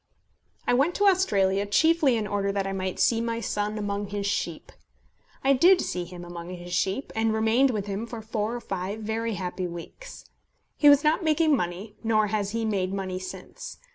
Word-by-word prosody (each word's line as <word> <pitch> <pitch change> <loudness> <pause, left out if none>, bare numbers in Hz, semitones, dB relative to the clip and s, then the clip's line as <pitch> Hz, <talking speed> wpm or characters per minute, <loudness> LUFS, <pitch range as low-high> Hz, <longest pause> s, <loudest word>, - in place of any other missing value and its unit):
I - - +2
went 280 +8 +2
to 410 - +2
Australia 205 - +3
chiefly 310 - +3
in 215 - -2
order 200 -1 -1
that 195 -1 -1
I 195 - -3
might 185 -1 -3
see 230 -1 +3
my 230 0 -2
son 210 -1 -2
among 205 -1 -3
his 200 0 -4
sheep. 200 - -3 0.7
I 275 +1 +5
did 350 +7 +6
see 180 -1 -2
him 175 0 -9
among 175 0 -8
his 175 -1 -7
sheep, 195 +9 -1
and 225 0 +1
remained 225 +5 +3
with 210 -5 -2
him 205 +3 -4
for 230 -2 -7
four 220 +1 -2
or 240 - -5
five 195 +2 -4
very 220 +1 -2
happy 180 0 -3
weeks. 175 - -10 0.5
He 295 - +6
was 285 +1 +6
not 310 +5 +2
making 310 -1 +3
money, 190 +1 -4
nor 215 -2 +2
has 205 -2 0
he 225 +1 -2
made 190 -4 -1
money 190 -2 -3
since. - - -8
210 Hz, 195 wpm, -26 LUFS, 195-240 Hz, 0.7 s, did